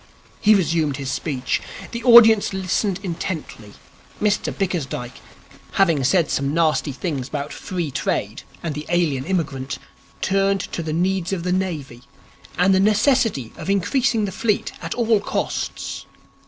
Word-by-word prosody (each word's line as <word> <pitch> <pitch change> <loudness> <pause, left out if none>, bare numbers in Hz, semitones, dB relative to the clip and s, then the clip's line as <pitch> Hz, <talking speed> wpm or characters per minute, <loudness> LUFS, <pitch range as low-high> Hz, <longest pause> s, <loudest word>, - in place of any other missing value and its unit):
He 215 +1 +5
resumed 160 -6 +1
his 135 -2 -4
speech. 130 -6 -2 0.3
The 235 0 -5
audience 225 -4 +7
listened 190 +1 -1
intently. 165 - -5 0.5
Mr 210 0 +1
Bickersdyke, 145 - -3 0.5
having 165 -8 +3
said 160 +4 +2
some 140 +2 0
nasty 160 -3 +2
things 140 -2 -3
about 145 0 -4
Free 175 -6 -4
Trade - - -2 0.2
and 165 -3 -2
the 150 +1 -6
Alien 165 -7 +1
Immigrant, 140 -7 -2 0.4
turned 195 0 +1
to 175 - -5
the 160 -1 -4
Needs 180 +2 0
of 175 -3 -2
the 180 0 0
Navy 155 -10 -3 0.6
and 185 +2 +4
the 190 - +4
necessity 215 - +2
of - - -6
increasing 220 +4 +1
the 195 - -4
fleet 210 +1 0
at - - -4
all 230 -3 +3
costs. 200 - -3
180 Hz, 140 wpm, -22 LUFS, 150-200 Hz, 0.6 s, audience